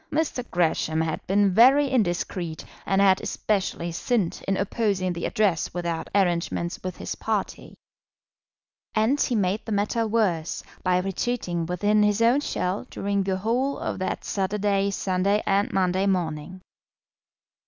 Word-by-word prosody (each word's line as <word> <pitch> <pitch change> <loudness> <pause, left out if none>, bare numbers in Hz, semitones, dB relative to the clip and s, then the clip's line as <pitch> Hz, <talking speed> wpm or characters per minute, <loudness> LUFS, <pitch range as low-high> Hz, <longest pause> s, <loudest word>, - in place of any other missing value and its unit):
Mr. 295 -5 -1
Gresham 160 -2 +1
had 160 -1 -2
been 200 0 +3
very 265 +7 +6
indiscreet, 175 -7 -1 0.2
and 195 - +2
had 190 -1 +4
especially 190 -4 -2
sinned 195 +1 -1
in 195 0 +1
opposing 195 -2 0
the 170 - -3
Address 195 -6 0
without 170 -2 -3
arrangements 175 -2 0
with 185 0 -5
his - - -4
party. - - -3 1.2
And 225 +7 +2
he 245 - +1
made 200 +1 0
the 225 - -7
matter 210 +3 0
worse 195 -8 0 0.2
by 180 -1 +2
retreating 185 -2 -2
within 205 +4 +2
his 210 0 +2
own 235 +4 +4
shell 200 -5 -2
during 200 0 -1
the 190 -1 -1
whole 245 +7 0
of - - -4
that 185 - -3
Saturday, 200 0 0
Sunday, 195 +1 0
and 200 0 +1
Monday 190 +1 +1
morning. 180 -1 -2
195 Hz, 140 wpm, -25 LUFS, 180-215 Hz, 1.2 s, very